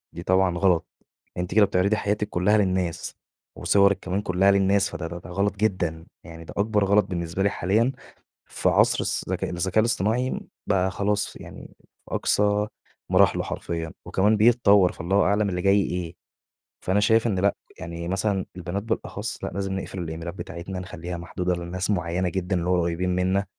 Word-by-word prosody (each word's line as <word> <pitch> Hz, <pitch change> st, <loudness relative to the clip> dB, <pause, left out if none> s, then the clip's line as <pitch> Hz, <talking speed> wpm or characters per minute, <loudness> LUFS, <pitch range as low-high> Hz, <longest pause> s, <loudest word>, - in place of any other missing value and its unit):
دي 85 Hz, -, -6 dB
طبعًا 95 Hz, -1 st, +2 dB
غلط، 90 Hz, -2 st, +2 dB, 0.5 s
أنتِ 90 Hz, 0 st, -3 dB
كده 110 Hz, -2 st, +7 dB
بتعرضي 100 Hz, +2 st, +1 dB
حياتِك 105 Hz, 0 st, -1 dB
كُلّها 100 Hz, +4 st, +2 dB
للناس، 95 Hz, -3 st, -1 dB, 0.4 s
وصورِك 100 Hz, -1 st, +3 dB
كمان 95 Hz, +1 st, -2 dB
كُلّها 95 Hz, 0 st, +3 dB
للناس 100 Hz, 0 st, +3 dB
فده 85 Hz, -1 st, -5 dB
ده 85 Hz, 0 st, -8 dB
غلط 100 Hz, +3 st, 0 dB
جدًا. 90 Hz, -6 st, -1 dB, 0.2 s
يعني 85 Hz, -1 st, -10 dB
ده -, -, -10 dB
أكبر 105 Hz, 0 st, +2 dB
غلط 100 Hz, 0 st, +4 dB
بالنسبة 85 Hz, 0 st, -3 dB
لي 100 Hz, -, +3 dB
حاليًا 105 Hz, +7 st, +1 dB, 0.6 s
في -, -, 0 dB
عصر -, -, +4 dB
الص -, -, -1 dB
ذكا -, -, -2 dB
الذكاء 90 Hz, +4 st, 0 dB
الاصطناعي 115 Hz, +3 st, +1 dB, 0.3 s
بقى 95 Hz, -2 st, +2 dB
خلاص 100 Hz, +1 st, 0 dB
ف -, -, -11 dB
يعني -, -, -11 dB, 0.3 s
أقصى 105 Hz, 0 st, +1 dB, 0.4 s
مراحله -, -, +4 dB
حرفيًا. 80 Hz, -1 st, -4 dB
وكمان 105 Hz, +3 st, +2 dB
بيتطوّر 105 Hz, -4 st, +5 dB
فالله 95 Hz, +4 st, 0 dB
أعلم 100 Hz, +1 st, +2 dB
اللي 90 Hz, -1 st, -2 dB
جاي 100 Hz, +2 st, +4 dB
إيه. 90 Hz, -3 st, -3 dB, 0.7 s
فأنا 95 Hz, +3 st, +2 dB
شايف 110 Hz, +3 st, +3 dB
إن 100 Hz, -5 st, 0 dB
لأ، 100 Hz, +2 st, +2 dB, 0.2 s
يعني 85 Hz, -1 st, -6 dB
مثلًا 95 Hz, +1 st, 0 dB
البنات 90 Hz, +2 st, -4 dB
بالأخص 115 Hz, 0 st, -4 dB
لأ -, -, -2 dB
لازم 95 Hz, 0 st, -3 dB
نقفل 95 Hz, -, -7 dB
الإيميلات 85 Hz, 0 st, -5 dB
بتاعتنا 95 Hz, 0 st, -6 dB
نخلّيها 90 Hz, -1 st, -6 dB
محدودة 90 Hz, +1 st, -2 dB
لناس 90 Hz, +2 st, -4 dB
معيّنة 90 Hz, -1 st, 0 dB
جدًا 95 Hz, +2 st, -2 dB
اللي 90 Hz, 0 st, -1 dB
هو 90 Hz, -1 st, +3 dB
قريبين 85 Hz, +2 st, -1 dB
منا. 95 Hz, +2 st, +1 dB
95 Hz, 170 wpm, -25 LUFS, 90-100 Hz, 0.7 s, كده